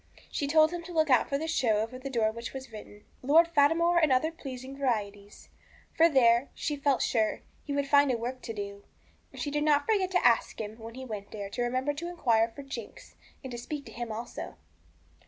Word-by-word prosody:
She 285 - -2
told 310 +2 +5
him 350 -1 -4
to 350 - -8
look 315 -3 +2
out 255 - +4
for 275 - 0
the 320 +3 -4
show 245 -9 +2
over 225 +4 -4
the 275 +1 -6
door 230 -4 +1
of 220 - -8
which 235 0 -6
was 265 -2 -8
written, 210 -1 -11 0.2
'Lord 315 +6 +5
Fatimore 335 +3 +3
and 310 -4 +3
other 260 +5 +2
Pleasing 265 -4 -8
Varieties,' 210 -6 -3 0.4
for 330 +1 +5
there, 245 -2 +4
she 295 - -2
felt 280 -2 +1
sure, 220 -3 0 0.2
he 285 - -4
would 280 0 0
find 285 -1 +5
a 245 - 0
work 250 +3 -5
to 225 - -6
do. 200 -1 -6 0.5
And - - -11
she 290 - -3
did 295 0 0
not 295 -1 +3
forget 395 -4 +1
to 365 -1 +1
ask 235 -1 +1
him, 215 +1 -6
when 225 +1 -9
he 260 0 -7
went 210 -4 -7
there, 200 -2 -7
to 245 - -3
remember 255 +4 0
to 325 +4 -5
inquire 235 -10 +2
for 280 - -8
Jinx, 275 - -9 0.3
and 260 - -7
to 240 - -5
speak 285 +4 -6
to 225 - -11
him 235 0 -5
also. 230 +3 -6
260 Hz, 230 wpm, -29 LUFS, 230-295 Hz, 0.5 s, told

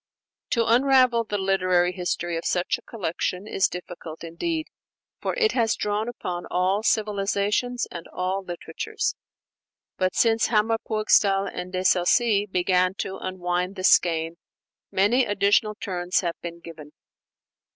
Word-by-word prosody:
To 230 -1 +1
unravel 250 -1 +4
the 205 -1 -2
literary 185 -2 +2
history 175 -2 -2
of 165 - -3
such 180 +6 0
a - - -19
collection 185 -3 -3
is 195 -2 +1
difficult 175 -3 -8
indeed, 315 - -3 0.6
for - - -2
it 445 -3 +3
has 225 -3 +1
drawn 210 +2 -1
upon 175 -7 -5
all 185 +3 +1
civilizations 210 +3 0
and 170 -1 -8
all 185 +2 -2
literatures. 175 -2 -4 0.8
But 185 0 0
since 225 -1 +3
Hammer 225 0 +2
Purgstall 205 -3 +3
and 180 +1 -6
De 185 0 -2
Sacy 205 +4 +3
began 185 0 +1
to 190 -1 -4
unwind 180 0 -2
the 185 - -6
skein, 165 -2 +3 0.5
many 210 +7 +3
additional 205 0 +2
turns 180 -4 -1
have 170 -2 -1
been 170 0 -7
given. 155 -3 -11
195 Hz, 135 wpm, -25 LUFS, 180-215 Hz, 0.8 s, unravel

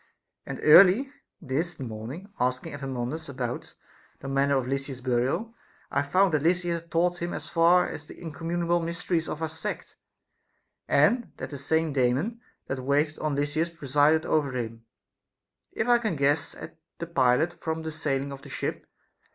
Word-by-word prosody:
And - - -5
early 195 - +7 0.3
this 160 +3 -3
morning, 130 - -7
asking 125 +2 -1
Epaminondas 135 +2 -4
about 125 -3 -5 0.4
the 135 - -8
manner 140 0 +2
of 130 - -1
Lysis's 135 -1 -3
burial, 130 - 0 0.4
I 140 - +2
found 185 +5 +2
that 150 - +2
Lysis 175 +1 +1
had 170 - -24
taught 175 +1 +1
him 170 0 -2
as - - -7
far 170 +2 +5
as 155 -1 -7
the - - -12
incommunicable 170 +2 -1
mysteries 170 0 -2
of 155 - -4
our - - +1
sect; 160 +1 -6 0.9
and 220 - +3
that - - -6
the 140 - -5
same 160 +2 0
Daemon 140 - +1 0.2
that 135 - -3
waited 145 +4 +1
on 155 -2 -1
Lysis 145 +4 0
presided 150 0 +2
over 145 -4 +1
him, 115 -1 -5 0.9
if 220 - -2
I 240 -1 +5
can 215 -7 -1
guess 145 +1 +1
at - - -10 0.2
the 170 - -4
pilot 145 +1 +2
from 160 0 -4
the 160 - -4
sailing 140 -3 -2
of 135 -1 -8
the - - -12
ship. - - -4
155 Hz, 165 wpm, -27 LUFS, 135-170 Hz, 0.9 s, early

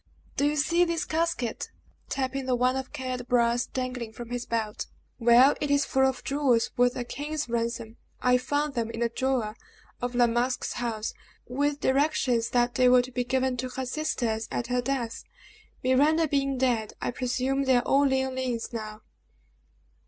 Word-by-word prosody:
"Do 285 - +2
you 295 - 0
see 335 +4 +3
this 335 -2 -1
casket?" 315 -8 -1 0.4
tapping 265 0 -2
the 255 - +2
one 250 +1 +2
of 265 0 -4
cared 255 -1 -4
brass 240 0 +2
dangling 250 -3 -4
from 240 0 -9
his 245 0 -3
belt; 220 -2 -2 0.3
"well, 240 +4 +6
it 295 - -1
is 285 -1 +3
full 265 0 +3
of 265 -1 -3
jewels 275 -5 +1
worth 245 0 +3
a 245 - -2
king's 295 +4 -4
ransom. 230 -1 -3 0.2
I 250 0 +3
found 290 +3 -1
them 230 -3 -1
in 230 +1 -3
a 235 - +1
drawer 240 -3 -1 0.5
of 245 0 -3
La 245 0 +5
Masque's 240 +2 0
house, 230 -2 -3 0.3
with 285 +3 -1
directions 260 -4 +2
that 240 0 +2
they 250 0 +4
were 250 0 +6
to 255 - -8
be 250 0 -1
given 260 0 0
to 255 +1 -3
her 260 +1 -4
sisters 245 -6 -2
at 235 - -2
her 250 +1 0
death. 245 -3 -3 0.6
Miranda 295 +6 +3
being 275 -2 0
dead, 240 -4 0
I - - -2
presume 255 +2 -1
they 260 -1 +4
are 245 - +1
all 280 +2 +3
Leoline's 260 -3 -1
now." 215 -1 -6
255 Hz, 175 wpm, -27 LUFS, 240-270 Hz, 0.6 s, well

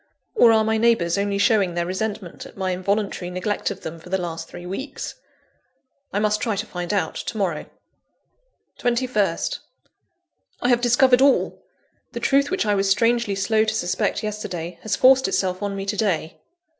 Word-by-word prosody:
Or 240 - +6
are 220 -1 +4
my 220 0 +1
neighbours 220 -8 +3
only 200 0 0
showing 200 -4 +2
their 170 0 0
resentment 190 0 -4
at - - -17
my 190 -1 -1
involuntary 195 0 -1
neglect 185 +3 -2
of 200 - -7
them 165 +1 -7
for 170 - -13
the 190 - +1
last 170 -3 -5
three 175 0 -10
weeks? 195 +11 -5 1.0
I - - -2
must 210 0 +1
try 225 -4 0
to 205 +2 -3
find 180 -4 -5
out 195 -6 0
to 220 - -5
morrow. 180 -7 -1 1.1
21st 235 -7 0 1.0
I 245 - 0
have 240 -1 +3
discovered 250 +1 +4
all! 275 0 +3 0.5
The - - -4
truth, 280 +1 +2
which 380 -7 0
I 210 - +2
was 195 -1 +1
strangely 230 +1 +2
slow 215 +3 +2
to 220 0 -1
suspect 175 0 -1
yesterday, 180 -5 -5
has 215 -2 -1
forced 265 0 +5
itself 185 0 -1
on 200 -1 -2
me 195 0 -4
to 200 +1 -2
day. 180 -7 -1
205 Hz, 175 wpm, -23 LUFS, 185-225 Hz, 1.1 s, Or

